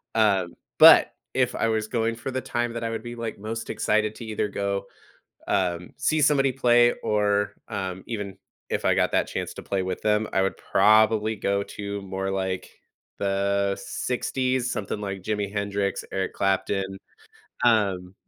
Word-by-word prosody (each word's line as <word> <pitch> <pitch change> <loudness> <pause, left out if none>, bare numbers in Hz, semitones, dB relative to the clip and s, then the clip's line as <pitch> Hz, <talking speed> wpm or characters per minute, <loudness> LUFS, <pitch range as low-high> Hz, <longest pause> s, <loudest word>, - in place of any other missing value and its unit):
Um, 100 -5 +2 0.3
but, - - +9 0.2
if - - +2
I - - +1
was 110 -1 0
going 115 -1 0
for 120 +3 -5
the 130 - -2
time 120 -1 -2
that 115 0 -4
I 115 - -1
would 115 0 -4
be, 120 - -6
like, 115 -2 -5
most 110 +2 -5
excited 110 0 0
to 115 - -8
either 110 -1 -1
go, 100 0 -2 0.6
um, 90 -2 0
see 155 +2 +1
somebody 140 -2 +4
play, 120 -2 +4
or, 105 -1 +1 0.2
um 95 -2 -4
even 105 -4 -4 0.3
if - - -2
I - - +4
got - - +2
that - - +2
chance - - -4
to - - -8
play 95 -1 -1
with 95 -1 -4
them, 105 0 +1
I 95 - +3
would 95 - -1
probably 110 0 +3
go 100 0 0
to 100 0 -6
more 95 0 -4
like 95 -1 -2 0.5
the 100 0 +1
60s' 130 0 -1
something 105 +1 -3
like 95 -2 -5
Jimi 105 -1 -2
Hendrix, 100 -1 -1
Eric 95 -1 -2
Clapton. 95 0 0 0.7
Um 100 -6 +2
105 Hz, 165 wpm, -25 LUFS, 95-115 Hz, 0.7 s, but